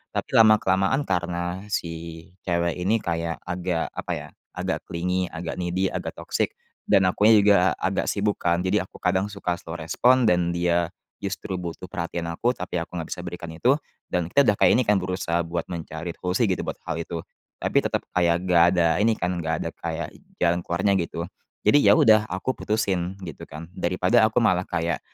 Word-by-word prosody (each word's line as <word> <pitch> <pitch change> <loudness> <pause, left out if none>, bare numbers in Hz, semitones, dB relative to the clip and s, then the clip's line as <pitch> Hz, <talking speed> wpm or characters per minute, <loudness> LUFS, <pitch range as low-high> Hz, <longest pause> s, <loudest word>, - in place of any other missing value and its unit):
Tapi - - -3
lama-kelamaan 110 +3 +4
karena 90 -1 -2
si 90 -4 -2 0.6
cewek 85 -1 0
ini 105 +5 +1
kayak 85 -1 -3
agak 90 -1 -2
apa, - - -5
ya, - - -7 0.3
agak - - -3
clingy, 90 +2 -1
agak 80 +1 -6
needy, 90 +2 0
agak - - -4
toksik, - - -2 0.3
dan 95 - +5
akunya 110 +4 +5
juga 100 -3 +4
agak 95 +1 -1
sibuk, 105 0 0
kan, 85 +1 +1
jadi 95 0 +1
aku - - -17
kadang 95 +2 +2
suka 95 -4 -3
slow 85 -1 -8
respon, 120 +11 +3
dan 85 -1 +1
dia 85 -1 +1 0.3
justru 95 -1 -4
butuh 90 +1 -6
perhatian 85 -2 -4
aku 120 +9 +1
tapi 90 0 -6
aku 85 +2 -7
nggak 80 - -6
bisa - - -4
berikan 85 -1 -6
itu, 105 +12 +3 0.3
dan 90 -1 -2
kita 140 0 +4
udah 105 - +4
kayak, - - +7
ini, - - +3
kan, 105 - +5
berusaha 90 -2 -1
buat 85 0 -4
mencari 85 0 -6
solusi, 95 +6 +1
gitu, 95 - -1
buat - - -5
hal 85 - -2
itu. 85 - -5 0.4
Tapi - - +2
tetap - - -1
kayak 85 0 +2
nggak 85 -2 +5 0.2
ada 85 - +4 0.2
ini, 115 - +4
kan, 90 +1 -1
nggak 80 0 0
ada - - -3
kayak - - -4 0.3
jalan 85 0 +2
keluarnya, 95 +4 +1
gitu. 85 +1 -5 0.4
Jadi, 145 - +5
ya, 100 - +8
udah, 110 -1 +5
aku 95 +7 -2
putusin, 95 -4 -1
gitu, 80 -5 -8
kan, 80 +3 -9
daripada 90 +6 +2
aku 110 - -8
malah 90 -3 +2
kayak, 85 -1 -1
90 Hz, 185 wpm, -24 LUFS, 85-95 Hz, 0.6 s, ya